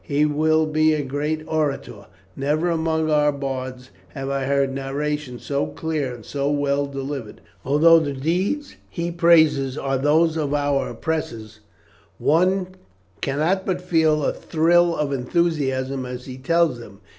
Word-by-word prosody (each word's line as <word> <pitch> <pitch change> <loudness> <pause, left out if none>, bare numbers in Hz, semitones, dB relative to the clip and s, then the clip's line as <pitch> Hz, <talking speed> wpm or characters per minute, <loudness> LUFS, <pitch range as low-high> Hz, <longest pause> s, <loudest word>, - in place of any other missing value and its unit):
He 150 -1 +1
will 155 +1 +2
be 155 0 +2
a 150 - -2
great 150 +3 -2
orator; 155 -3 -3 0.3
never 155 +5 0
among 160 -1 0
our 150 -1 +3
bards 130 -3 -5 0.2
have 135 0 -4
I 135 -1 -1
heard 140 0 +1
narrations 135 -1 -4
so 140 0 -1
clear 155 -5 -3
and 120 -3 -10
so 140 0 -2
well 145 -1 0
delivered; 135 -4 -6 0.2
although 165 +4 +5
the 145 -3 -2
deeds 185 - -2
he 170 0 -3
praises 160 -6 +4
are 135 -1 -1
those 155 +3 +3
of 145 -2 -1
our 145 -1 0
oppressors, 115 -9 -4 0.6
one 180 +4 +2 0.5
cannot 155 +8 0
but 185 -2 -1
feel 160 -4 +2
a - - +1
thrill 170 +1 +2
of 145 -2 -1
enthusiasm 135 -2 -1
as 125 0 -7
he 130 -1 -8
tells 165 -2 +1
them. 100 -4 -12
145 Hz, 145 wpm, -22 LUFS, 135-160 Hz, 0.6 s, although